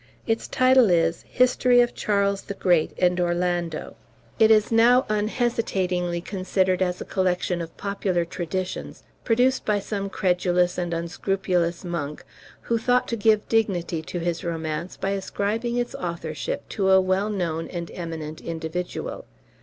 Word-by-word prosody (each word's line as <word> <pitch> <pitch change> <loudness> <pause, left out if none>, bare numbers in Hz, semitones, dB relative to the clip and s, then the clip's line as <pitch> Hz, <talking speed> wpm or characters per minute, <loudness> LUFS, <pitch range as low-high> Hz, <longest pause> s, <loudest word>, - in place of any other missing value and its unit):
Its 225 0 -1
title 255 -3 +5
is 165 -1 +2
"History 250 0 +4
of 240 0 +3
Charles 200 -1 0
the 200 - -7
Great 175 -5 +2
and 180 0 +2
Orlando." 175 -2 -1 0.4
It 220 -1 +6
is 215 0 +4
now 240 +3 +5
unhesitatingly 205 -6 0
considered 185 0 0
as 180 -1 0
a - - -5
collection 180 -2 0
of 165 -1 -8
popular 195 -3 -1
traditions, 185 +1 -5 0.2
produced 250 +3 +2
by 210 -1 +1
some 200 0 -3
credulous 180 -2 +1
and 175 -1 -2
unscrupulous 175 +1 -1
monk, 150 -4 -4 0.4
who 230 -1 0
thought 245 +2 +2
to 235 - 0
give 215 -1 +2
dignity 180 -7 0
to 160 - -6
his 170 +1 -2
romance 165 0 -4
by 195 - -2
ascribing 210 +4 -2
its 245 0 -1
authorship 165 -4 -4
to 195 -2 0
a 190 0 +7
well 190 +2 +1
known 170 -5 -2
and 170 -2 -6
eminent 160 -3 -6
individual. 165 +2 -5
185 Hz, 145 wpm, -24 LUFS, 170-210 Hz, 0.4 s, a